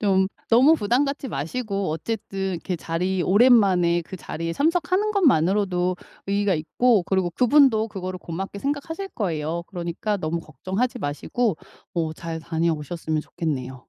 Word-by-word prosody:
좀 190 -2 +3 0.2
너무 260 +8 +7
부담 245 +2 +2
갖지 275 -1 -4
마시고 195 - -2
어쨌든 195 +2 -3
이렇게 180 +2 -4
자리 180 +3 -1
오랜만에 190 -5 +4
그 185 - -9
자리에 165 -1 -4
참석하는 355 - +1
것만으로도 185 - +2 0.3
의의가 200 -1 +1
있고 205 +7 +2
그리고 190 -2 0
그분도 245 - +4
그거를 185 -2 -5
고맙게 190 +4 -6
생각하실 295 - -3
거예요. 170 -4 -2
그러니까 180 +3 -3
너무 165 -1 -2
걱정하지 200 - -3
마시고 160 - -1 0.4
어 160 -2 -1
잘 165 0 -6
다녀오셨으면 160 -1 -1
좋겠네요. 130 -7 -4
190 Hz, 365 characters per minute, -24 LUFS, 165-235 Hz, 0.4 s, 너무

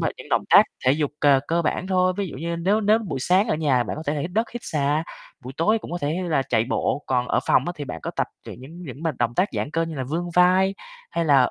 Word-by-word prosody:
bài, - - 0
những - - -11
động - - +2
tác - - +9 0.2
thể 130 - +5
dục 150 -1 0
c - - +1 0.2
cơ 170 +1 +1
bản 170 +3 -1
thôi. 185 -1 +2
Ví 200 -1 -1
dụ - - -8
như 170 +4 -3
nếu 195 +6 +1
nếu 215 +1 +4
buổi 165 - -5
sáng 190 - +2
ở - - +2
nhà 140 -6 +2
bạn - - -5
có 155 - -6
thể 145 - 0
là 145 - -2
hít 170 - -4
đất, 225 +4 0
hít 240 - -6
xà, 150 +1 0 0.4
buổi 130 - -7
tối 215 +7 +2
cũng - - -10
có 175 - -3
thể 145 +3 -1
là 145 -4 +2
chạy 115 -4 +1
bộ, 145 - -1
còn 125 -1 0
ở - - +2
phòng 130 - +4
á 175 - -2
thì 145 - -5
bạn 80 -10 -7
có - - -4
tập - - -1 0.2
những - - -9
những 160 +7 -11
những 140 -2 -9
bài 160 -2 0
động 120 0 0
tác 190 +3 +2
giãn 145 - -3
cơ 165 +2 0
như 165 -1 -4
là 135 -3 -3
vươn 170 +6 -3
vai, 185 +2 +4 0.4
hay 170 - -1
là 140 -5 +4
160 Hz, 295 wpm, -23 LUFS, 140-180 Hz, 0.4 s, tác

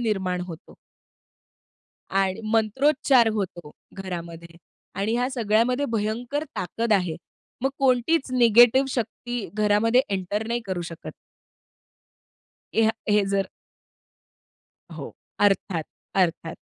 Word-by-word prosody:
निर्माण 190 -6 -1
होतो. 165 -2 -11 1.4
आणि 195 +2 0
मंत्रोच्चार 260 +3 +3
होतो 175 -7 -4 0.2
घरामध्ये 170 -3 -7 0.4
आणि 220 +3 0
ह्या 245 +1 0
सगळ्यामध्ये 245 +2 +1
भयंकर 235 +6 -2
ताकद 220 +4 -1
आहे. 180 -5 +1 0.5
मग 270 - +2
कोणतीच 265 +2 +2
निगेटिव्ह 240 +2 +6
शक्ती 240 -2 -4
घरामध्ये 215 +4 +3
एंटर 200 +3 -2
नाही 235 +1 -1
करू 185 -2 -3
शकत. 165 - -8 1.6
ह्या 220 -1 +4 0.2
हे 210 -1 +4
जर 195 -1 +1 1.5
हो, - - -7 0.3
अर्थात, 195 -5 +1 0.3
अर्थात. 170 -3 0
215 Hz, 95 wpm, -24 LUFS, 190-240 Hz, 1.6 s, निगेटिव्ह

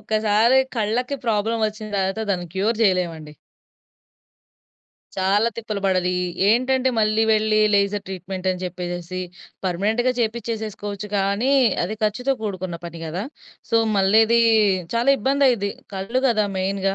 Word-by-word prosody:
ఒక్కసారి 220 +4 +2 0.2
కళ్ళకి 235 +5 -1
ప్రాబ్లమ్ 225 +1 0
వచ్చిన 215 0 -9
తర్వాత 195 +2 -1
దాన్ని 175 -2 -3
క్యూర్ 215 +4 0
చేయలే‌మండి. 170 -6 0 1.8
చాలా 195 +4 +2
తిప్పలు 215 -3 -4
పడాలి. 185 -1 +1
ఈ - - -1 0.3
ఏంటంటే 260 +2 +2
మళ్ళీ 215 +1 +2
వెళ్లి 215 0 +2 0.2
లేజర్ 200 0 +1
ట్రీట్మెంటని 185 0 -4
చెప్పేసేసి 175 0 -5 0.4
పర్మనెంట్‌గా 215 +8 0
చేపించేసేసుకోవచ్చు 215 -3 -3
గానీ 200 +7 +1 0.3
అది 185 +5 -2
ఖర్చుతో 250 +6 0
కూడుకున్న 185 -4 -4
పని 170 -1 -7
గదా! 165 +4 -4 0.5
సో 230 - +3 0.2
మళ్ళిది 220 +4 +4 0.5
చాలా 235 +3 +1
ఇబ్బందయిద్ది. 265 -7 +2 0.2
కళ్ళు 195 +7 -2
గదా 215 -3 +2
మెయిన్‌గా 195 +1 -1
210 Hz, 115 wpm, -22 LUFS, 190-225 Hz, 1.8 s, మళ్ళిది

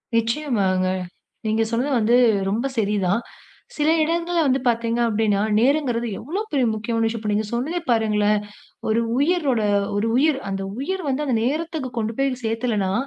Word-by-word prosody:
நிச்சயமாங்க. 225 -6 +1 0.6
நீங்கச் 220 +1 +1
சொன்னது 250 +5 0
வந்து 225 +2 +3 0.4
ரொம்ப 230 +6 0
சரிதான். 200 -1 +1 0.6
சில 300 0 +1
இடங்கள்ல 335 +2 0
வந்து 265 0 +2
பாத்தீங்க 230 0 0
அப்டின்னா, 215 -2 +1 0.2
நேரங்குறது 245 -3 +1
எவ்வளவு 390 - -4
பெரிய 265 -4 +2
முக்கியம். 225 +1 -1
இப்ப 215 -1 -3
நீங்க 210 +1 0
சொன்னதே 305 +9 -1
பாருங்களேன் 210 -2 +2 0.5
ஒரு 220 +1 +2 0.2
உயிரோட 285 -7 +2 0.3
ஒரு 210 +3 0
உயிர், 290 +1 +3
அந்த 195 0 -3 0.2
உயிர் 375 +7 -2
வந்து 275 +2 0
அந்த 250 -4 +1
நேரத்துக்குக் 300 -2 -3
கொண்டு 225 +1 -2
போய் 275 0 +2
சேக்கலனா 220 -4 0
235 Hz, 140 wpm, -22 LUFS, 215-285 Hz, 0.6 s, வந்து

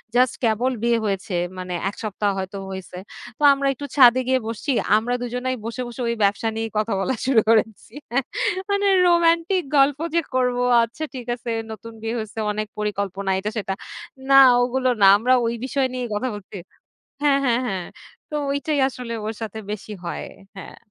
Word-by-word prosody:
Just 250 0 +3
কেবল 235 +3 +2
বিয়ে 235 -1 +3
হয়েছে, 195 -2 -2 0.2
মানে, 180 -1 -5 0.2
১ - - -10
সপ্তাহ 205 -1 -1
হয়তো 190 +1 -5
হইছে। 190 -1 -8 0.4
তো 295 - -5
আমরা 275 0 -1
একটু 285 +2 -7
ছাদে 255 -1 +7
গিয়ে 260 0 +3
বসছি। 230 +5 -3 0.3
আমরা 240 +3 -1
দুজনাই 250 +1 -2
বসে, 235 +2 -4
বসে, 240 +1 -7
ওই 235 - 0
ব্যবসা 200 +3 +1
নিয়ে 225 0 -3
কথা 215 0 0
বলা 260 +6 0
শুরু 255 -5 +4
করেছি। 220 -1 +1 0.8
মানে, 400 0 +1 0.2
রোমান্টিক 340 +2 +3
গল্প 280 +1 +4 0.2
যে 335 - +4
করব, 250 -1 +1 0.3
আচ্ছা 235 +7 -5
ঠিক 245 -2 -6
আছে, 240 -1 -6 0.2
নতুন 225 +1 -9
বিয়ে 225 +1 -3
হয়েছে, 220 0 -6
অনেক 215 0 -3
পরিকল্পনা, 200 -2 -3
এটা 210 +2 -3
সেটা। 195 -2 -2 0.6
না, 275 0 +8 0.2
ওগুলো 255 +1 0
না। 195 - +8
আমরা 250 +4 +2
ওই 230 - 0
বিষয় 265 0 0
নিয়ে 250 -1 -3
কথা 255 +4 -1
বলছি 200 0 -9 0.7
হ্যাঁ, 280 -1 +4
হ্যাঁ, 240 -1 +2
হ্যাঁ। 185 -3 -3 0.4
তো - - -6 0.2
ঐটাই 285 +1 -1
আসলে 245 -2 -7
ওর 220 - -3
সাথে 220 0 -5
বেশি 210 0 -6
হয়। 170 - -4 0.3
হ্যাঁ। - - -10
235 Hz, 175 wpm, -22 LUFS, 210-260 Hz, 0.8 s, না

